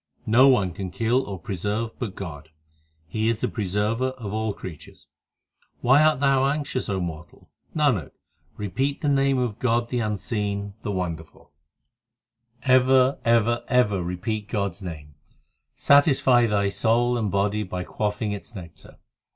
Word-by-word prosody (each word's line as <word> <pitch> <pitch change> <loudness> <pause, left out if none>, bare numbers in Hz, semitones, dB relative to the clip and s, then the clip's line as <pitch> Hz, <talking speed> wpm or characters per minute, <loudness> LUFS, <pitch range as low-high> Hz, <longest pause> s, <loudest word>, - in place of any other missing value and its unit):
No 120 +5 +6
one 105 -9 +3
can 95 +1 -5
kill 115 +7 +1
or 100 -2 -5
preserve 105 +6 -3
but 110 -5 -4
God; 80 -5 -8 0.6
He 110 +4 -1
is 115 -1 -1
the - - +1
Preserver 105 +4 -1
of 105 -5 -6
all 110 0 -1
creatures. 90 -5 -11 0.7
Why 135 +4 +5
art 155 -3 +3
thou 135 -1 +3
anxious, 140 -5 -2
O 95 -1 -1
mortal? 85 -2 -7 0.2
Nanak, 135 - +1 0.5
repeat 130 +8 -2
the - - -1
name 135 -1 +2
of 120 -4 -2
God 120 -1 +1
the 125 - -1
unseen, 105 -2 -3
the - - -5
wonderful; 85 -6 -5 1.1
Ever, 130 0 +4
ever, 120 0 +2
ever 105 -7 +2
repeat 100 +5 -3
God 100 -2 -1
s 90 - -18
name; 75 -5 -8 0.6
Satisfy 135 -4 +4
thy 100 -2 +1
soul 120 +4 +1
and 110 -4 -1
body 100 +2 0
by 90 -2 -4
quaffing 105 +2 -2
its 105 +3 -7
nectar. 85 -3 -11
110 Hz, 145 wpm, -24 LUFS, 100-125 Hz, 1.1 s, No